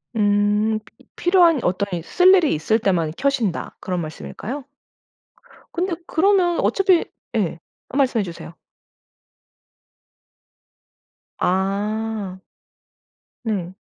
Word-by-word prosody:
음 210 +1 +2
피 220 - -21
이 - - -33
"필요한 350 -4 +4
어떤 185 +3 0
이 - - -8
쓸 360 - +5
일이 355 -6 +4
있을 215 +9 +1
때만 175 -7 +1
켜신다." 250 -10 -1
그런 180 -2 -3
말씀일까요? 220 - -6 1.1
근데 355 +1 -1
그러면 360 0 +3
어차피 380 -3 +3 0.3
예. 180 -7 0 0.3
아 265 - -4
말씀해 255 -6 +2
주세요. 170 -2 -8 2.9
아. 200 +1 -1 1.0
네. 190 -6 -2
215 Hz, 190 characters per minute, -21 LUFS, 190-315 Hz, 2.9 s, 쓸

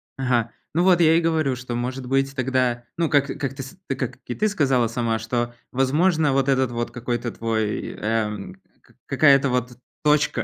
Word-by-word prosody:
Ага, 125 -3 0 0.2
ну 170 +3 +2
вот 180 -2 +5
я 160 -1 +5
и 165 - +4
говорю, 160 -5 +1
что, 120 -1 -6
может 125 +2 -3
быть, 135 +1 0
тогда, 130 -2 0
ну, 165 -2 +1
как 140 -2 +3
как 135 -3 -2
ты 135 0 -7
с 135 - -11
ты 135 - -1
как 130 -2 -4
и 165 - 0
сказала 135 - +2
сама, 115 -1 -1
что, 120 +2 -2 0.2
возможно, 150 +3 +2
вот 135 0 +1
этот 130 -2 +2
вот 120 0 -3
какой-то 120 -1 -3
твой, 110 -2 -2
э, 110 0 0 0.8
какая-то 140 -1 +4
вот 125 -1 -2 0.3
точка, 150 0 +2
130 Hz, 180 wpm, -23 LUFS, 120-145 Hz, 0.8 s, вот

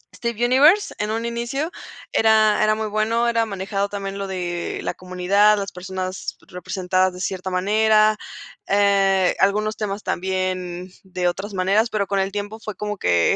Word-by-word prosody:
Steven 235 0 -1
Universe 295 +11 +4
en 210 +1 -1
un 225 +1 -2
inicio 240 +6 -2 0.4
era 220 -1 +4
era 215 0 +3
muy 220 0 -3
bueno. 220 +3 +1
Era 230 -1 +2
manejado 200 -1 -3
también 195 -1 -5
lo 200 0 -4
de 175 -2 -3
la - - -2
comunidad, 185 +3 +2
las 200 -1 -4
personas 185 +1 -5
representadas 185 +1 -1
de 180 - -10
cierta 185 0 -3
manera, 215 +3 +3 0.5
eh, 195 -2 +3
algunos 210 +2 +2
temas 205 -1 -3
también 185 -1 -3
de 180 -1 -2
otras 195 +4 -3
maneras, 195 +5 +2
pero 205 -3 -1
con 200 - 0
el 195 0 -1
tiempo 205 +2 -5
fue 215 -2 -7
como 210 0 -4
que 85 - +2
200 Hz, 160 wpm, -22 LUFS, 185-215 Hz, 0.5 s, Universe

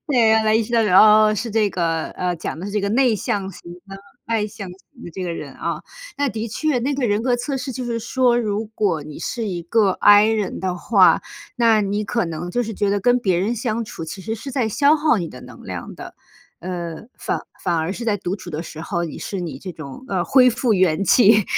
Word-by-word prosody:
对， 235 -7 +4
后 220 - 0
来 215 0 +3
意 225 - +3
识 220 - -8
到， 230 - +4
哦 215 +2 +6
哦 215 - +1
是 225 +3 -3
这 215 -1 +1
个 165 -3 -1
呃， 180 -1 -2
讲 160 - -5
的 180 - -6
是 205 - -6
这 210 - +1
个 200 0 -1
内 240 0 +3
向 195 -1 -2
型 170 -1 -12 0.2
的、 195 - -8 0.3
外 225 -2 0
向 205 -2 -8
型 180 +1 -12 0.2
的 - - -8
这 185 - -6
个 175 - -3
人 - - -7
啊。 - - -4 0.4
那 285 0 +1
的 220 -1 -4
确， 280 +5 -1
那 275 +4 -1
个 270 -3 0
人 210 0 0
格 250 0 +2
测 250 +3 -3
试 265 0 -4
就 250 +1 -5
是 235 -1 -2
说， 240 +1 +1
如 215 -1 -2
果 180 -9 0
你 150 0 -9
是 230 -3 -3
一 175 -3 -4
个 205 +3 +2
I 205 +2 +6
人 220 -3 -1
的 185 -1 -2
话， 195 +1 +4 0.3
那 230 -3 +4
你 205 +1 -1
可 230 -2 -1
能 165 +2 -5
就 245 +7 0
是 225 -1 -5
觉 200 0 0
得 200 0 0
跟 245 +4 +3
别 190 -7 +1
人 215 +6 -1
相 230 0 -2
处 190 -6 -7
其 165 +5 -7
实 220 +4 -4
是 250 +5 -7
在 255 -4 0
消 285 +7 +4
耗 305 -4 +2
你 175 -5 -2
的 125 - -11
能 - - -13
量 - - -7
的。 - - -10 0.5
呃， 175 +2 -5
反 - - -2 0.2
反 175 -2 0
而 160 +3 -1
是 235 - -6
在 215 -3 +1
独 190 0 -4
处 190 - -11
的 160 -1 -4
时 160 -2 -9
候， 170 +1 -2
你 165 - -5
是 195 - -5
你 160 -7 -5
这 185 +4 -7
种， 155 - -10
呃， 185 -6 -1
恢 255 -2 +5
复 245 -1 +1
元 185 -2 +2
气。 210 +1 +5
210 Hz, 265 characters per minute, -21 LUFS, 180-235 Hz, 0.5 s, 哦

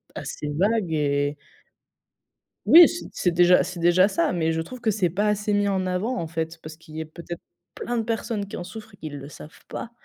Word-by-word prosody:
assez 150 - -5
vague 200 -3 +1
et 145 -1 0 1.3
Oui, 340 +1 +10
c'est 345 - -6
c'est 180 - +1
déjà 175 +1 +5
c'est 180 - -6
déjà 175 +3 +5
ça, 190 -3 0
mais 165 -2 0
je 160 0 -1
trouve 245 +8 -9
que 220 -2 +2
c'est 190 -4 +1
pas 205 +5 0
assez 210 0 0
mis 205 0 +2
en 190 -1 0
avant, 200 +8 -1
en 165 - -3
fait, 160 0 -4
parce 155 0 -9
qu'il 155 -1 -15
y - - -4
ait - - -5
peut-être 170 +2 -9 0.3
plein 240 0 -3
de 225 - 0
personnes 225 -2 -2
qui - - -7
en 175 - -5
souffrent 220 +2 -10
et - - -35
qui 155 - -7
le 140 0 -8
savent 150 - -13
pas. 235 - -6
180 Hz, 225 wpm, -24 LUFS, 160-210 Hz, 1.3 s, Oui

